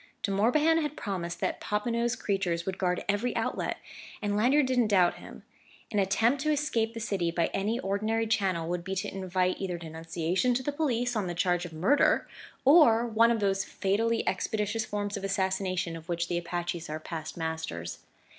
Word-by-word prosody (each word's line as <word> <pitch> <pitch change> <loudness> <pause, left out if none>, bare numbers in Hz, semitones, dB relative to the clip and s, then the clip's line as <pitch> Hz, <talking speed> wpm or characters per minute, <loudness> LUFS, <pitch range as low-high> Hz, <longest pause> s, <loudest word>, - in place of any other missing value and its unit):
De 200 - 0
Morbihan 300 +11 +3
had 300 0 -3
promised 175 -4 -4
that - - -1
Popinot's 235 +3 0
creatures 180 -6 -1
would 190 -1 -4
guard 180 -1 0
every 205 +5 0
outlet; - - -1 0.4
and 205 -1 -1
Lanyard 260 +7 +4
didn't 250 -3 +2
doubt 185 -4 +3
him. - - -11 0.5
An 210 - +1
attempt 225 +7 +2
to 305 - 0
escape 235 -7 0
the - - -4
city 200 -6 -1
by 170 0 0
any 210 +5 0
ordinary 215 +2 0
channel 190 -7 0
would 175 0 -2
be 190 +1 -3
to 190 - -3
invite 185 -1 0
either 180 -3 -2
denunciation 165 +7 -1
to 260 - -1
the 290 - -1
police 245 -5 0
on 205 -4 0
the 175 - -3
charge 175 0 +1
of 175 - -8
murder, 190 - +3 0.4
or 260 -6 +6
one 230 0 +4
of 230 -2 +1
those 195 -1 +1
fatally 225 +4 0
expeditious 210 +3 -1
forms 205 -1 -3
of 200 - -7
assassination 190 -3 -1
of 165 0 -11
which 170 0 -1
the 175 - 0
Apaches 175 -1 -4
are 155 +1 -3
past 160 0 -6
masters. 160 - -4
195 Hz, 185 wpm, -29 LUFS, 175-230 Hz, 0.5 s, or